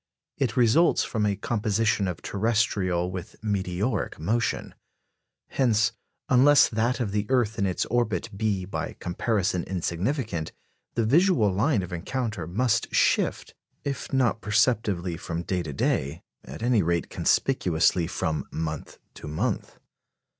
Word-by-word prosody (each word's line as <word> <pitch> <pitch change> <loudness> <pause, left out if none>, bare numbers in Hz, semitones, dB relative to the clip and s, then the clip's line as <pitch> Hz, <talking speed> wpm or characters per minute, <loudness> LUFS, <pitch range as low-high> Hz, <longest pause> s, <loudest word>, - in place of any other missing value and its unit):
It 130 -4 0
results 125 +8 +4
from 105 -2 -1
a 100 - 0
composition 105 -1 0
of 90 - -5
terrestrial 100 -5 0
with 90 -1 -7
meteoric 100 +1 -1
motion. 110 +9 -1 0.8
Hence, 115 -4 +2 0.4
unless 135 +3 +6
that 115 +3 0
of 115 -5 -1
the 105 0 -1
earth 115 -4 +1
in 100 - +2
its 90 - -1
orbit 115 -6 0
be 100 -3 -1
by 95 - -4
comparison 90 0 -1
insignificant, 90 - -2 0.4
the 115 - +1
visual 145 - +3
line 105 +1 +2
of 90 - -7
encounter 105 0 -3
must 115 +5 0
shift, - - +1 0.3
if 140 -2 -4
not 125 -4 +1
perceptibly 105 -6 +1
from 85 +1 -4
day 90 0 -1
to 80 -3 -5
day, 70 +2 -1 0.2
at 70 - -9
any 120 -3 +3
rate 85 0 -1
conspicuously 85 -8 +2
from 80 -2 -2
month 80 -2 -5 0.2
to - - -10
month. 75 +1 -2
105 Hz, 130 wpm, -26 LUFS, 90-120 Hz, 0.8 s, unless